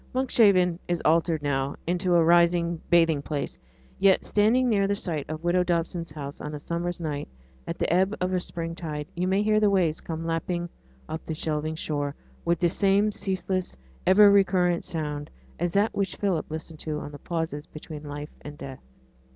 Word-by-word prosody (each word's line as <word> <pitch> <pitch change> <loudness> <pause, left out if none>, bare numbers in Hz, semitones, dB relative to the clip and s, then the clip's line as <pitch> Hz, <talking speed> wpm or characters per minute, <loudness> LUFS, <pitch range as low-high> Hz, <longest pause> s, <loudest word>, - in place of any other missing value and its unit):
Monkshaven 200 -9 +4
is 175 -1 0
altered 160 -1 +2
now 140 -1 0
into 180 +1 +1
a 170 - +5
rising 170 0 +3
bathing 165 -4 +4
place. 140 - -4 0.4
Yet, 195 -1 +4
standing 225 +5 +3
near 200 -4 +2
the 200 - +1
site 160 -8 -3
of 155 +1 -5
widow 175 +1 +3
Dobson's 170 -1 -1
house 145 -2 -7
on 150 0 -5
a - - -5
summer's 170 +3 -3
night, 150 -3 -3 0.4
at - - -3
the - - 0
ebb 190 +4 +2
of 180 +1 -1
a 185 - +2
spring 165 -1 -4
tide, 150 -3 -5
you 180 +2 -1
may 195 +2 +2
hear 215 0 +3
the 210 -1 +4
waves 175 -5 +1
come 165 0 -5
lapping 170 +1 -2 0.4
up 160 - -5
the 160 - -2
shelving 155 0 -2
shore 145 -2 -2 0.3
with 170 0 +2
the 175 - +2
same 200 +3 +3
ceaseless, 185 - -2 0.3
ever 205 +2 +8
recurrent 185 -3 +3
sound 150 -2 -4 0.3
as 175 0 -1
that 205 +3 +2
which 200 -2 -1
Philip 190 -6 -1
listened 160 0 -7
to 155 -1 -3
in - - -7
the 145 - -10
pauses 160 -2 -3
between 155 -1 -9
life 145 0 -7
and 145 0 -9
death. 135 -2 -8
170 Hz, 185 wpm, -26 LUFS, 155-185 Hz, 0.4 s, ever